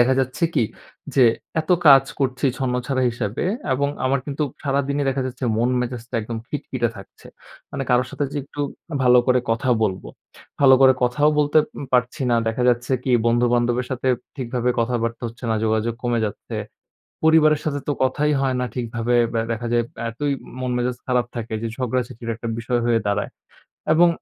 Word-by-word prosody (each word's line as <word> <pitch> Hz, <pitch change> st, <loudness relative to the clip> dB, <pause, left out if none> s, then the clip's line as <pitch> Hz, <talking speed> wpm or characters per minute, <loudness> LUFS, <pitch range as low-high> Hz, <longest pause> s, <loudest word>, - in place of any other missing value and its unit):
দেখা 130 Hz, +2 st, +4 dB
যাচ্ছে 130 Hz, +6 st, -1 dB
কি? 115 Hz, -, +3 dB, 0.5 s
যে 130 Hz, -3 st, +6 dB, 0.4 s
এত 155 Hz, -, -8 dB, 0.2 s
কাজ 135 Hz, -1 st, +9 dB, 0.2 s
করছি 130 Hz, 0 st, 0 dB
ছন্নছাড়া 130 Hz, 0 st, -1 dB
হিসাবে 115 Hz, 0 st, -3 dB, 0.3 s
এবং 140 Hz, +2 st, 0 dB, 0.2 s
আমার 135 Hz, +1 st, +2 dB
কিন্তু 145 Hz, +1 st, -2 dB, 0.2 s
সারাদিনই 140 Hz, 0 st, 0 dB
দেখা 135 Hz, 0 st, -1 dB
যাচ্ছে 130 Hz, +1 st, -5 dB
মন 120 Hz, +2 st, +2 dB
মেজাজটা 120 Hz, -1 st, -5 dB
একদম 115 Hz, +1 st, -5 dB
খিটখিটে 130 Hz, -5 st, -2 dB
থাকছে। 100 Hz, -, -14 dB, 0.5 s
মানে 135 Hz, -, -3 dB
কারো 125 Hz, +1 st, +4 dB
সাথে 145 Hz, -, -2 dB
যে -, -, -4 dB
একটু 145 Hz, +1 st, -8 dB, 0.4 s
ভালো 125 Hz, 0 st, +6 dB
করে 125 Hz, 0 st, +4 dB
কথা 115 Hz, +3 st, 0 dB
বলব। 95 Hz, -3 st, 0 dB, 0.6 s
ভালো 135 Hz, -1 st, +8 dB
করে 130 Hz, -1 st, +8 dB
কথাও 125 Hz, +5 st, +3 dB
বলতে 150 Hz, +1 st, +4 dB, 0.3 s
পারছি 125 Hz, +3 st, +1 dB
না। 120 Hz, -, +4 dB
দেখা 115 Hz, +2 st, -1 dB
যাচ্ছে 125 Hz, +2 st, +1 dB
কি 130 Hz, -, -1 dB, 0.2 s
বন্ধু-বান্ধবের 120 Hz, +1 st, +2 dB
সাথে 130 Hz, 0 st, -1 dB, 0.3 s
ঠিকভাবে 125 Hz, -1 st, -1 dB
কথাবার্তা 115 Hz, 0 st, -1 dB
হচ্ছে 120 Hz, +2 st, -12 dB
না, 110 Hz, -, +2 dB
যোগাযোগ 110 Hz, +1 st, 0 dB
কমে 120 Hz, -2 st, 0 dB
যাচ্ছে। 100 Hz, -, -7 dB, 0.7 s
পরিবারের 155 Hz, -2 st, +5 dB
সাথে 145 Hz, -2 st, -1 dB
তো -, -, +2 dB
কথাই 150 Hz, +3 st, +1 dB
হয় 130 Hz, -1 st, +1 dB
না 125 Hz, -, 0 dB
ঠিকভাবে 120 Hz, 0 st, -1 dB, 0.4 s
দেখা 115 Hz, +1 st, -3 dB
যায় 120 Hz, 0 st, +3 dB, 0.3 s
এতই 140 Hz, +5 st, -2 dB, 0.3 s
মন 125 Hz, -1 st, -2 dB
মেজাজ 125 Hz, 0 st, -1 dB
খারাপ 125 Hz, -2 st, +2 dB
থাকে 115 Hz, -1 st, -5 dB
যে 115 Hz, -, -2 dB
ঝগড়াঝাটির 120 Hz, -2 st, -3 dB
একটা 115 Hz, 0 st, -6 dB
বিষয় 120 Hz, +1 st, 0 dB
হয়ে 115 Hz, -1 st, +3 dB
দাঁড়ায় 100 Hz, +1 st, 0 dB, 0.6 s
এবং 170 Hz, +2 st, +6 dB
125 Hz, 170 wpm, -22 LUFS, 120-135 Hz, 0.7 s, কাজ